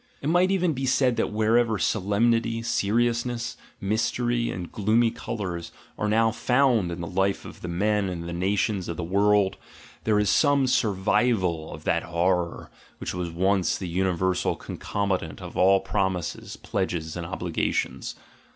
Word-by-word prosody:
It 145 - -2
might 175 +3 +4
even 180 -4 +2
be 135 0 -2
said 130 -1 +3
that - - 0
wherever 110 +1 +2
solemnity, 115 +4 +1
seriousness, 115 +1 0 0.2
mystery, 120 +3 0
and 90 -1 -5
gloomy 115 +2 +2
colours 90 -9 -5 0.2
are 105 - -1
now 115 +1 +3
found 125 -6 +2
in 85 +1 -5
the - - -3
life 95 +3 0
of - - -11
the - - -5
men 100 +3 +1
and 85 -2 -5
of 85 - -4
nations 95 +1 0
of 85 - -4
the 85 - -3
world, 100 +2 +2 0.5
there 110 -1 +3
is 105 0 +2
some 145 -2 +4
survival 95 -6 +1
of - - -9
that - - +1
horror 85 +1 -1 0.3
which - - -4
was 90 -1 -3
once 95 +1 +1
the 95 - -5
universal 95 +1 0
concomitant 95 -6 -3
of - - -9
all 95 +1 +5
promises, 95 -3 -2
pledges, 80 -2 -3
and 85 -2 -5
obligations. 90 -2 -2
100 Hz, 150 wpm, -26 LUFS, 90-115 Hz, 0.5 s, all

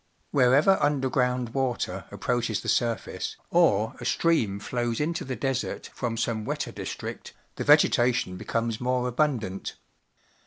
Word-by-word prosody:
Wheie\ 135 +2 +5
er 195 0 +5
undei'ground 130 -4 +1
water 130 -3 -2
approaches 115 -3 -1
the - - -8
surface, 115 -5 -1
or 110 - +3
a - - -7
stream 115 -13 +1
flows 120 +1 -2
into 165 +3 -1
the 130 -1 -4
desert 135 -1 -3
from 115 -2 -3
some 110 -1 -1
wetter - - -3
district, - - -6 0.2
the - - -3
vegetation 120 -6 +4
becomes 115 +4 -2
more 125 0 0
abundant. 120 -7 -1
125 Hz, 130 wpm, -27 LUFS, 115-135 Hz, 0.2 s, Wheie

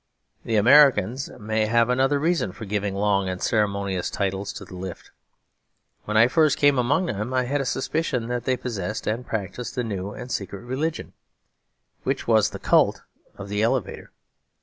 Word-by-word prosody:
The 115 - -1
Americans 125 0 +5
may 110 0 0
have 115 +1 +3
another 135 +3 +2
reason 150 - 0
for 110 - -8
giving 100 -1 -2
long 100 -1 +1
and 90 0 -4
ceremonious 100 -4 0
titles 100 0 -2
to - - -8
the - - -13
lift. 90 -1 -8 0.9
When 110 +2 +4
first 155 +2 +3
I - - -12
came 145 -2 +5
among 135 +10 +2
them 115 - -3
I 130 - +2
had 140 +3 -1
a - - -3
suspicion 135 -3 -1
that 120 0 -3
they 130 -1 +1
possessed 105 -4 -4
and 115 +3 -2
practised 110 +4 -5
a 125 - 0
new 100 -4 -4
and 125 +4 -8
secret 100 -1 -4
religion, 140 +6 -3 0.9
which - - -2
was 110 -2 +4
the - - -7
cult - - +2 0.3
of 100 - -7
the 105 +1 -1
elevator. 115 0 -1
115 Hz, 170 wpm, -24 LUFS, 100-130 Hz, 0.9 s, Americans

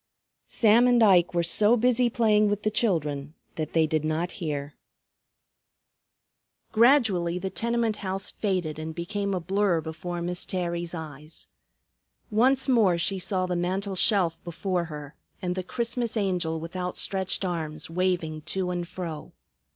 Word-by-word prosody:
Sam 230 +2 +4
and 245 -2 +5
Ike 180 -4 +4
were 170 - +2
so 210 +7 +5
busy 245 +1 +3
playing 215 -3 +3
with 205 0 -2
the 215 - +1
children 150 -9 -1 0.2
that 155 -1 -4
they 160 -1 +4
did 155 0 0
not 155 +3 -1
hear. 145 -3 -3 2.0
Gradually 220 -8 +3
the 190 +1 -4
tenement 235 -2 0
house 195 0 -3
faded 180 -7 -2
and 160 0 -6
became 200 +3 -2
a - - -1
blur 190 0 +1
before 165 +2 -5
Miss 180 +1 -3
Terry's 175 -1 -3
eyes. 155 -1 -9 0.8
Once 255 +5 +3
more 220 -9 +4
she 190 +3 0
saw 185 0 0
the 180 -1 -2
mantel 190 +3 -2
shelf 180 -4 +2
before 175 +1 -2
her 150 -2 -8 0.3
and 180 -1 -2
the 185 - -3
Christmas 235 +4 -2
Angel 180 -5 -1
with 165 +3 -8
outstretched 185 +1 -2
arms 160 -4 -3
waving 170 -3 -1
to 185 +3 -3
and 175 -1 -3
fro. 170 -4 -7
180 Hz, 145 wpm, -26 LUFS, 165-210 Hz, 2.0 s, and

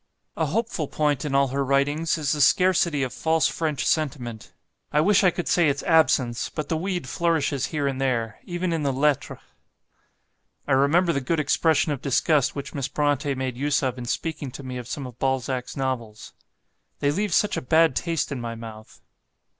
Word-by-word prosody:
A 160 - 0
hopeful 190 -3 -2
point 150 -2 0
in 140 -2 -1
all 140 -1 +3
her 140 +2 -1
writings 145 +5 +1
is 150 -3 -1
the 150 - 0
scarcity 170 -1 +3
of 130 - -3
false 160 -2 +2
French 155 -4 -2
sentiment; 125 -8 -2 0.4
I 150 - +2
wish 200 +5 +4
I 185 - +6
could 175 0 -4
say 170 -4 +3
its 140 0 -2
absence; 130 -7 +2
but 155 -2 -5
the 165 - +1
weed 175 -3 -3
flourishes 155 -4 0
here 150 -3 -2
and 135 -1 -2
there, 115 -5 -1
even 175 0 -2
in 165 - -1
the 140 -2 0
'Lettres.'" 140 +1 0 1.3
I - - -2
remember 155 +6 +3
the 140 - -1
good 155 +5 -1
expression 155 +1 +2
of 140 - -3
disgust 140 0 +2
which 140 - -6
Miss 135 -2 -3
Brontë 145 -1 0
made 130 -2 -3
use 145 +1 0
of 130 -1 -1
in 120 - -6
speaking 155 0 -3
to 140 - -8
me 130 -1 -6
of 120 -2 -7
some 140 +1 -5
of 125 -2 -10
Balzac's 130 -1 -2
novels: 120 -5 -4 0.6
"They 145 - +1
leave 205 +5 -1
such 210 +5 +2
a - - -2
bad 160 +1 +3
taste 165 -4 -1
in 135 -3 -4
my 115 -1 -5
mouth." 110 -1 -11
145 Hz, 195 wpm, -24 LUFS, 130-160 Hz, 1.3 s, I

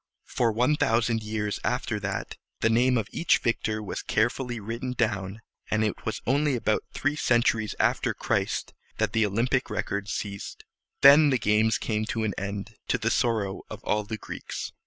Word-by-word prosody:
For 120 -2 +1
one 125 +7 +2
thousand 115 -2 +2
years 105 -1 -2
after - - -1
that, - - -4 0.3
the 115 - +3
name 125 +2 +3
of 110 -3 -1
each 170 - +3
victor 110 -2 -1
was 100 - -4
carefully 120 +2 0
written 115 +4 -4
down; 105 -3 -1 0.3
and 110 0 +1
it 105 - -3
was 110 - -2
only 140 +2 +2
about 110 -2 +1
three 145 +2 -1
centuries 120 -6 +1
after - - +1
Christ - - -1 0.2
that - - 0
the 110 -2 +3
Olympic 125 +6 0
records 100 0 -3
ceased. 100 -1 -5 0.4
Then 145 +2 +8
the 130 - +3
games 105 0 +2
came 110 -1 -1
to 115 0 -2
an 105 -2 0
end, 100 +2 -5
to - - +2
the 115 0 0
sorrow 110 -6 0
of - - -8
all 105 0 0
the 110 +2 -5
Greeks. - - -6
110 Hz, 175 wpm, -27 LUFS, 105-120 Hz, 0.4 s, Then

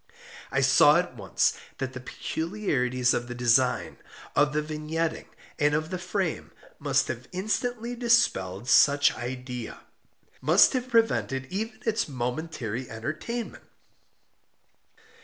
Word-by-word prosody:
I 135 - +1
saw 140 +3 +6
at 175 -7 -2
once 100 -5 0 0.2
that 135 -1 -4
the 130 - -6
peculiarities 130 - -1
of 120 - -2
the 125 - -6
design, 125 +1 +2 0.4
of 145 +1 +4
the 150 0 -1
vignetting, 155 +2 -3 0.3
and 145 0 +3
of 155 +3 -2
the 185 - -3
frame, 185 +2 -2 0.3
must - - +1
have - - -5
instantly 230 +5 -2
dispelled 120 - +1
such 140 +2 +5
idea—must 125 - -1
have 255 -1 -2
prevented 225 - +1
even 220 +4 -4
its 220 -6 0
momentary 125 -2 -4
entertainment. 155 - -5
150 Hz, 115 wpm, -27 LUFS, 125-190 Hz, 0.4 s, saw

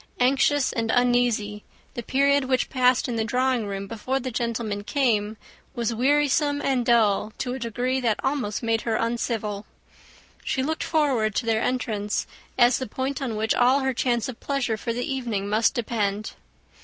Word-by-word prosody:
Anxious 270 +2 +2
and 225 -1 -2
uneasy, 240 -4 +1 0.3
the 240 - -4
period 280 +3 +2
which 255 -1 0
passed 255 0 +3
in 240 -2 -2
the 220 - +1
drawing 250 -1 0
room 195 0 -4
before 230 +6 -2
the 255 0 -4
gentlemen 225 -3 -2
came, 220 -4 0 0.4
was 235 -2 -1
wearisome 285 +3 +2
and 265 -3 0
dull 220 -3 +2
to 250 -1 -3
a 260 - -5
degree 245 +2 -1
that 225 -4 +1
almost 260 -6 -1
made 225 -1 +1
her 225 -2 -1
uncivil. 220 -3 -2 0.8
She 260 - -1
looked 315 +3 -2
forward 260 - +1
to 245 - 0
their 225 -1 +1
entrance 215 -5 -1 0.3
as 245 0 +5
the 260 - -4
point 265 +5 -3
on 245 -5 -2
which 220 +1 +1
all 255 +3 +3
her 265 0 0
chance 240 -2 0
of 255 -3 -7
pleasure 275 -5 -1
for 230 +2 -4
the 245 +2 -2
evening 235 -7 -2
must 215 +5 +2
depend. 215 -3 -2
240 Hz, 170 wpm, -25 LUFS, 220-260 Hz, 0.8 s, as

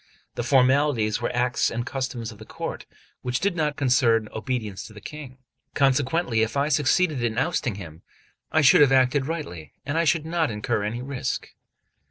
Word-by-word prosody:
The - - -3
formalities 125 -3 +3
were 120 - -1
acts 125 0 +1
and 120 +1 -3
customs 125 -4 -4
of 105 - -14
the - - -9
court, - - -6 0.3
which 125 0 -1
did 195 -2 0
not 150 -3 0
concern 120 -5 +2
obedience 110 -4 -3
to 110 - -14
the 105 - -11
King; 135 +2 -9 0.4
consequently, 135 -2 +2
if 110 +5 -1
I 140 +2 +1
succeeded 150 -1 +2
in 115 -1 -1
ousting 125 -3 0
him, 85 -4 -10 0.5
I 160 - +3
should 145 - +6
have 140 -2 +6
acted 130 +1 +3
rightly, 115 - -6
and 160 +2 +1
should 155 0 0
not 165 -2 0
incur 110 +1 -1
any 115 +4 -3
risk. 135 -1 -3
130 Hz, 175 wpm, -25 LUFS, 115-145 Hz, 0.5 s, should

